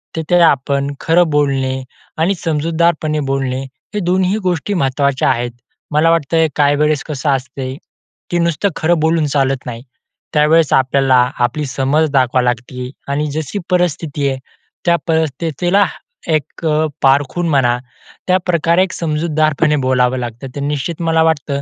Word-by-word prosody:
तिथे 165 +2 +1
आपण 140 -2 +2
खरं 165 0 +3
बोलणे 135 -3 0 0.4
आणि 175 +5 +2
समजूतदारपणे 160 -1 0
बोलणे 135 -1 -1 0.3
हे - - +1
दोन्ही 185 0 +1
ही 215 - +1
गोष्टी 180 +2 -1
महत्त्वाच्या 140 -3 +1
आहेत. 120 -1 0 0.4
मला 155 +2 +3
वाटतं 160 0 +2
काही 145 -1 +3
वेळेस 150 -1 +1
कसं 145 -1 -2
असते 130 0 -2 0.6
की 175 - +1
नुसतं 170 +3 +1
खरं 165 0 +1
बोलून 160 0 +2
चालत 135 -2 0
नाही. 120 0 -6 0.5
त्यावेळेस 155 +1 +3
आपल्याला 130 0 +3 0.3
आपली 150 +5 -3
समज 140 +4 +1
दाखवा 130 -2 +2
लागती 125 +1 -3 0.2
आणि 150 +2 0
जशी 155 +6 -3
परिस्थिती 160 -5 0
आहे, 135 - -2 0.5
त्या 170 0 +4
परिस्थितीला 160 +4 +1 0.4
एक 155 +1 -2
अ, 155 0 +2 0.2
पारखून 140 +5 +2
म्हणा, 125 -4 +2 0.5
त्याप्रकारे 180 -1 +2
एक 190 - -3
समजूतदारपणे 155 -1 +1
बोलावं 130 0 +2
लागतं. 120 +2 -6
तर 140 - -4
निश्चित 150 +4 -3
मला 165 -1 +2
वाटतं, 145 -3 0
150 Hz, 140 wpm, -16 LUFS, 135-165 Hz, 0.6 s, त्या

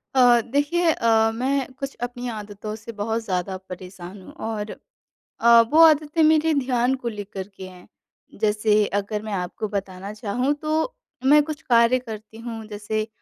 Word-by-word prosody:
अ, 245 -2 +6
देखिए 290 +8 +1
अ, 225 -4 +3
मैं 265 +2 -1
कुछ 275 +1 -6
अपनी 245 0 -7
आदतों 210 -1 -6
से 220 +2 -9
बहुत 220 +2 -1
ज़्यादा 190 -2 -2
परेशान 185 +1 -9
हूँ - - -13
और 215 -1 -4 0.7
अ, 235 0 +7
वो 240 +8 +2
आदतें 310 0 +4
मेरे 315 +1 +4
ध्यान 255 -2 +1
को 240 - -4
लेकर 205 -3 -7
के 190 - -8
हैं, 180 -1 -14 0.5
जैसे 210 0 +3
अगर 205 +1 -4
मैं 215 -1 -5
आपको 190 +3 -3
बताना 195 -1 -5
चाहूँ 245 +6 -1
तो 315 +9 -1 0.3
मैं 295 +2 +7
कुछ 300 -1 -6
कार्य 235 +1 +4
करती 220 -2 -9
हूँ, 225 -1 -7
जैसे 215 +1 -3
225 Hz, 160 wpm, -23 LUFS, 205-260 Hz, 0.7 s, अ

